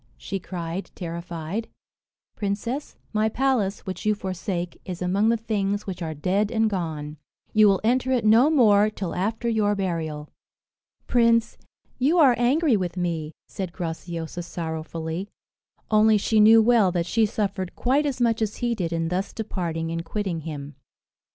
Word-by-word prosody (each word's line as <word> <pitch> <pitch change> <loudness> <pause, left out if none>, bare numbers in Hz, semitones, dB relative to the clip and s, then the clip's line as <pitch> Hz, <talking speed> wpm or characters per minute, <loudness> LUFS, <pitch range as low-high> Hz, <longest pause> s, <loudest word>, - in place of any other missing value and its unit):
she 195 - -4
cried, 175 0 -5
terrified. 170 +3 -5 0.7
"Princess, 220 +7 -3 0.2
my 215 +1 +2
palace, 230 -5 0
which 185 - -6
you 215 0 +2
forsake, 185 -2 -4
is 180 -2 -6
among 195 +5 +2
the 230 - +3
things 205 -2 -1
which 185 -2 -6
are 160 -2 -3
dead 195 +7 0
and 220 -1 +2
gone. 155 -5 -4 0.4
You 215 -1 +6
will 195 -2 +4
enter 255 +3 +2
it 245 -4 +1
no 230 +7 +6
more 215 -8 +5
till 195 -4 -5
after 220 +5 -2
your 215 -3 +2
burial." 160 -6 -3 0.7
"Prince, 230 -1 +3 0.4
you 290 +7 +3
are 280 -7 +7
angry 270 +2 +3
with 180 -3 -2
me," 165 -3 -2
said 185 -3 -5
Graciosa 170 -1 -5
sorrowfully; 165 +2 -5 0.6
only 215 0 +5
she 215 +2 +2
knew 220 +1 +7
well 225 -5 +4
that 170 -1 -1
she 220 +4 +2
suffered 200 -4 -3
quite 280 +4 +1
as 270 -3 -3
much 230 -2 +2
as 215 -1 -1
he 240 -1 -1
did 180 -7 -2
in 165 -1 -1
thus 185 +2 -2
departing 170 -7 -3
and 165 0 -3
quitting 190 -1 -3
him. 145 -2 -7
195 Hz, 155 wpm, -24 LUFS, 170-225 Hz, 0.7 s, are